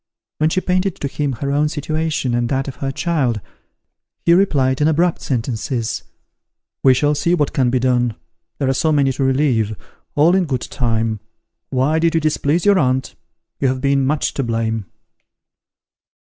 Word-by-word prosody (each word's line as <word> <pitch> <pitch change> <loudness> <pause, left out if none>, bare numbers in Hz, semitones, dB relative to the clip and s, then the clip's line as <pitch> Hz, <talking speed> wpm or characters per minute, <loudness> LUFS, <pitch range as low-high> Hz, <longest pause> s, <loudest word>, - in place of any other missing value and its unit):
When 155 +1 +3
she 185 - 0
painted 185 0 0
to 140 - -4
him 140 0 -2
her 140 +4 -3
own 150 +1 +2
situation 155 -3 -2
and 120 0 0
that 135 0 -1
of 135 - -6
her 135 -1 -2
child, 135 -8 0 0.9
he 170 - +5
replied 140 -8 +2
in 150 - +4
abrupt 165 +2 +1
sentences, 120 -1 -2 0.8
"We 130 -1 +5
shall 145 +3 +2
see 170 +4 +1
what 145 -5 0
can 130 -2 +2
be 130 - +1
done 125 -2 +1 0.4
there 140 - -1
are 135 - +2
so 160 +4 +1
many 140 -3 +3
to 135 +1 -2
relieve 130 -6 +1 0.4
all 155 +4 +4
in 190 -1 +3
good 130 -6 -2
time 115 -3 -1 0.5
why 140 +5 +1
did 165 0 +2
you - - +4
displease 155 +2 0
your 200 -2 +5
aunt? 130 -2 0 0.5
you 135 - +2
have 130 0 0
been 140 0 +2
much 145 +3 0
to - - -2
blame." 115 -3 -2
140 Hz, 175 wpm, -19 LUFS, 125-155 Hz, 0.9 s, he